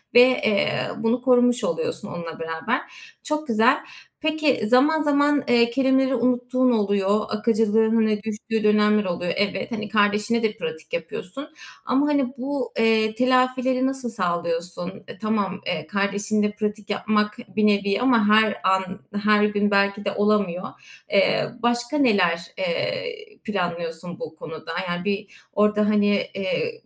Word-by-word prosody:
ve, 245 - +10
eee, 215 -5 +3 0.3
bunu 235 +2 0
korumuş 245 -1 +3
oluyorsun 485 - -2
onunla 170 -3 -7
beraber. 165 - -2 0.4
Çok 305 0 -2
güzel. 230 +4 +4 0.5
Peki, 310 -7 +1
zaman 285 +7 +4
zaman, 290 -1 +2
eee, 235 -1 +4
kelimeleri 265 +1 +2
unuttuğun 250 +1 +1
oluyor. 205 -1 +1
Akıcılığının 220 0 +2 0.2
düştüğü 220 0 -3
dönemler 210 0 +3
oluyor. 175 -1 -2
Evet. 205 +4 -2
Hani, 220 -1 -4
kardeşine 210 +2 +1
de 215 -1 -1
pratik 485 0 -7
yapıyorsun 300 - -6 0.4
ama, 270 +3 +2
hani, 280 -4 0
bu, 265 0 -3
eee, 220 -1 +2
telafileri 255 +1 +2
nasıl 265 -3 -3
sağlıyorsun? 175 -1 -3
E, - - -10
tamam, 205 -3 -2
eee, 155 -3 -3
kardeşinle 205 +1 0
pratik 210 0 -4
yapmak 210 +1 0 0.2
bir 215 0 +3
nevi 200 -1 +1
ama 235 -4 +3
her 215 0 +4
an, 190 +1 0 0.2
her 210 0 +4
gün 205 0 0
belki 200 +1 +1
de 200 - 0
olamıyor. 205 -3 0 0.4
Eee, 200 -1 +2
başka 240 +4 0
neler, 195 - +3 0.2
eee, 475 - -2 0.3
planlıyorsun 175 -4 -4
bu 155 - -7
konuda? 160 0 -8 0.2
Yani 175 +1 -3
bir 205 0 -3 0.2
orada, 210 0 +2
hani, 205 -2 +2
ııı, 330 - -1
215 Hz, 135 wpm, -23 LUFS, 200-250 Hz, 0.5 s, ve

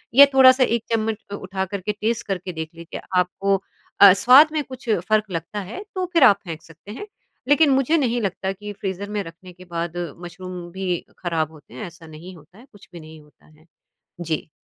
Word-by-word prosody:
या 280 +2 +11
थोड़ा-सा 260 0 +7
एक 235 -2 0
चम्मच 220 -1 -1
अ, 200 - -3
उठा 190 -1 -4
कर 200 +1 -6
के 210 - -2
टेस्ट 225 +3 -2
करके 185 -2 -4
देख 160 -1 -5
लीजिए 170 0 -9 0.2
आपको 195 +2 0 0.5
अ, 200 -2 +10
स्वाद 250 +10 +7
में 305 -1 0
कुछ 260 -2 -10 0.2
फ़र्क 215 -1 +2
लगता 170 +4 -4
है 385 - -7
तो 370 -1 -1
फिर 335 -5 +5
आप 205 -6 +6
फेंक 160 -2 -7
सकते 165 +5 -14
हैं। 335 - -8 0.4
लेकिन 295 +1 +5
मुझे 270 +4 +3
नहीं 245 -5 0
लगता 190 -1 -2
कि 205 +2 -8
फ्रीज़र 195 +1 -4
में 210 0 -2
रखने 175 +2 -12
के 185 +1 -15
बाद 170 -1 -4 0.3
मशरूम 180 0 -8
भी 190 +1 -4 0.3
खराब 160 -3 -2
होते 145 -7 -17
हैं, 125 - -6
ऐसा 170 -1 -14
नहीं 165 +4 -11
होता 165 +5 -19
है 240 - -16
कुछ 205 -2 -18
भी 170 - -9
नहीं 155 0 -13
होता 150 0 -25
है। 155 +1 -23 0.6
जी। 160 -2 -3
190 Hz, 210 wpm, -22 LUFS, 170-225 Hz, 0.6 s, या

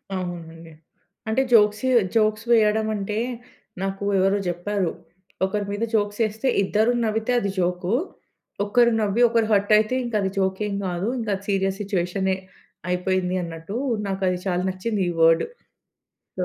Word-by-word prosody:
అవునండి. 165 -2 -6 0.6
అంటే 220 +4 +2
జోక్స్ 210 -2 +5
ఏ - - +2 0.2
జోక్స్ 215 0 +2
వెయ్యడం 220 -1 +4
అంటే, 210 +1 -3 0.6
నాకు 195 +1 -3 0.2
ఎవరో 195 +2 +3
జెప్పారు. 175 +1 -1 0.5
ఒకరి 205 +2 -2
మీద 205 +2 -2
జోక్స్ 205 -1 0
ఏస్తే 220 +5 -4 0.2
ఇద్దరు 215 +4 +2
నవ్వితే 220 +2 -1
అది 200 - -2
జోకు. 180 +2 0 0.7
ఒక్కరు 235 +3 +4
నవ్వి 210 +2 +1
ఒకరు 230 -1 +2
హర్ట్ 205 0 +2
అయితే 215 +4 +1
ఇంక 240 -1 -5
అది 190 - 0
జోక్ 190 -1 0
ఏం 200 - -3
గాదు. 180 +2 -2
ఇంక 225 - -4
అది 195 +1 -10
సీరియస్ 195 0 0
సిచ్యువేషనే 190 -1 -1 0.5
అయిపోయింది 180 0 0
అన్నట్టూ 165 +3 -7 0.3
నాకు 195 0 -3
అది 180 - -1
చాలా 180 -1 0
నచ్చింది 195 +3 -2
ఈ - - -1
వర్డ్. 165 0 +5 0.9
సో - - -1
200 Hz, 150 wpm, -23 LUFS, 185-215 Hz, 0.9 s, జోక్స్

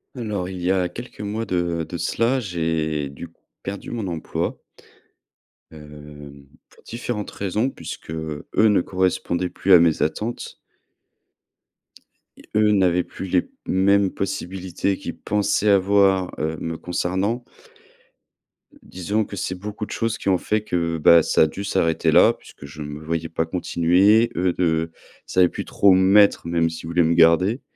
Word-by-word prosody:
Alors 105 -7 -3
il 90 -1 -7
y 90 +2 +1
a 90 -2 +1
quelques 120 +6 -10
mois 105 +2 -3
de 85 -2 -1
de 85 +1 -6
cela, 120 +8 0
j'ai 80 - -2
du 70 +5 -9
coup 85 - -31 0.2
perdu 100 0 -6
mon 115 -5 -4
emploi 85 -3 -4 1.1
hem, 75 -2 -12 0.2
pour - - -22
différentes 115 -3 -5
raisons, 105 +6 -1
puisque 105 - -9
eux 80 -2 -6
ne 105 -2 +4
correspondaient 90 -1 -1
plus 95 +2 +1
à 90 - +9
mes 85 -2 +2
attentes 105 +10 -3 1.8
et - - -18
eux 105 0 +4
n'avaient 90 -3 +2
plus 95 - -8
les 90 0 0 0.2
mêmes 100 +1 +2
possibilités 95 0 -3
qu'ils - - -7
pensaient 105 0 0
avoir, 95 -1 +3
heu, 80 +1 -2
me 80 0 -4
concernant 95 +8 -2 1.4
disons 100 +4 -2
que 100 - -9
c'est 95 - -3
beaucoup 105 +3 -6
de - - -12
choses 115 -1 -2
qui - - -8
ont 95 -2 +4
fait 110 +4 -1
que, 85 -5 -2
ben 85 +2 +6
ça - - +1
a - - +3
dû 95 +6 -7
s'arrêter 85 -5 +1
là, - - +6
puisque - - -15
je 75 +2 -10
ne 75 - -5
me 75 0 -7
voyais 80 0 -3
pas 80 0 -1
continuer. 90 +6 +3
Eux 90 +1 +1
ne 80 -2 +1
ils - - -19
savaient 90 -1 +4
plus - - -5
trop 100 - +3
où - - +7
me 95 0 +4
mettre 100 -2 +4
même, 85 -1 +1
s'ils 80 0 -8
voulaient 85 +1 +2
me 80 +1 +2
garder 85 - +4
90 Hz, 165 wpm, -22 LUFS, 80-100 Hz, 1.8 s, à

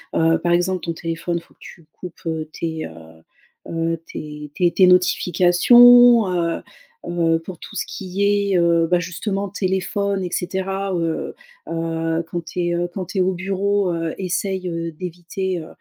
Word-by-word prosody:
heu, 165 0 +3
par 175 +1 -1
exemple 175 +1 +1
ton 170 - -2
téléphone. 165 +1 -3
Faut - - -22
que - - -45
tu 165 - -13
coupes, 180 -2 -10
heu, 160 -1 -3
tes, 160 -1 -4
heu - - -9 0.8
heu, 165 0 -1
tes 150 -1 -8
tes 175 -2 +2
tes 185 +1 +5
notifications, 190 +6 +6
heu 170 -2 -1 0.5
heu, 165 -1 +1
pour 170 +1 -10
tout - - -11
ce - - -2
qui 200 +2 -1
est, 180 - +4
heu, 170 -1 +3
bah 180 - +4
justement 195 +3 -3
téléphone 190 0 -1
et 175 - -4
cetera. 190 +1 -2
Heu 165 -1 -2 0.3
heu, 165 0 -2
quand 175 -1 -3
tu 180 - -6
es, 175 - 0
heu, 175 0 -1
quand 185 -2 -4
tu 195 - -6
es - - +4
au 185 +1 +1
bureau, 195 +1 0
heu, 165 -1 -3
essaie, 190 +1 -2
heu, 165 -1 -3
d'éviter, 180 +2 -4
heu 155 - -9
175 Hz, 175 wpm, -21 LUFS, 165-190 Hz, 0.8 s, notifications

